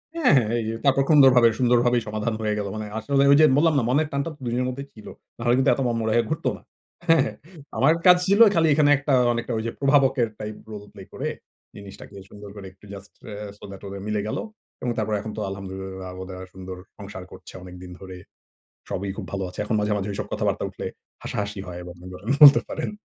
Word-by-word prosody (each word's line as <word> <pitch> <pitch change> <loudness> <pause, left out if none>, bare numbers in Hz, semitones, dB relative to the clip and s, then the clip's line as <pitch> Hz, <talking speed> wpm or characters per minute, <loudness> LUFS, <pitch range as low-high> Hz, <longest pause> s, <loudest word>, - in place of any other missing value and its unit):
হ্যাঁ, 325 -6 +3
হ্যাঁ। 120 -4 +2
এই - - -2 0.2
তারপর 135 0 +4
কুন্দরভাবে 130 -6 +7
সুন্দরভাবেই 120 -1 +3
সমাধান 110 +2 -2
হয়ে 105 -1 0
গেল। 100 - -3
মানে 110 0 -5
আসলে 135 +5 +1
ওই 140 - +7
যে 155 - +8
বললাম 160 +2 +4
না? 135 - +2
মনের 150 +4 +2
টানটা 140 +3 -2
তো 145 - -30
২ 120 - -2
জনের 125 +1 0
মধ্যেই 140 +2 -6
ছিল। 110 - -13 0.3
নাহলে 120 0 +1
কিন্তু 130 +1 +3
এত 135 - -3
মনমরা 115 -2 -1
হয়ে 120 -1 +2
ঘুরত - - -4
না। - - -19 0.5
হ্যাঁ, 165 0 +6
হ্যাঁ? 110 - -6 0.4
আমার 145 +4 +4
কাজ 180 -1 +8
ছিল, 200 +2 +3 0.2
খালি 165 -1 +3
এখানে 145 0 +3
একটা 140 +1 -1 0.2
অনেকটা 120 0 -3
ওই 110 - -3
যে, - - -3
প্রভাবকের 135 -3 +3
টাইপ 105 0 -6 0.2
রোল 105 -1 -7
প্লে 100 - -12
করে, - - -4 0.5
জিনিসটাকে 100 0 -12
সুন্দর 105 0 -11
করে 100 -2 -9
একটু 95 - -20
জাস্ট 100 0 -11 0.2
এ - - -6 0.2
সো - - -20
দ্যাট, 95 - -10
ওদের 100 0 -7
মিলে 105 -1 -1
গেলো। - - -3 0.4
এবং 125 - -1
তারপরে 110 -1 -1
এখন 110 +1 -6
তো - - -3
আলহামদুলিল্লাহয 95 -1 -7
ওদের 95 0 -9
আর 95 - -9
সুন্দর 95 -1 -8 0.2
সংসার 100 -2 -9
করছে - - -13
অনেকদিন 90 0 -11
ধরে। 95 -1 -10 0.7
সবই 100 +1 -3
খুব - - -6
ভালো 100 -1 -2
আছে। 90 - -13
এখন 110 - -2
মাঝে, 105 0 0
মাঝে 100 0 -3
ঐসব 100 - -4
কথাবার্তা - - -1
উঠলে, - - -7 0.4
হাসাহাসি 100 0 -4
হয় 90 -1 -7
এবং 90 0 -9 0.5
বলতে 140 -1 +10
পারেন। - - -4
110 Hz, 215 wpm, -24 LUFS, 100-135 Hz, 0.7 s, বলতে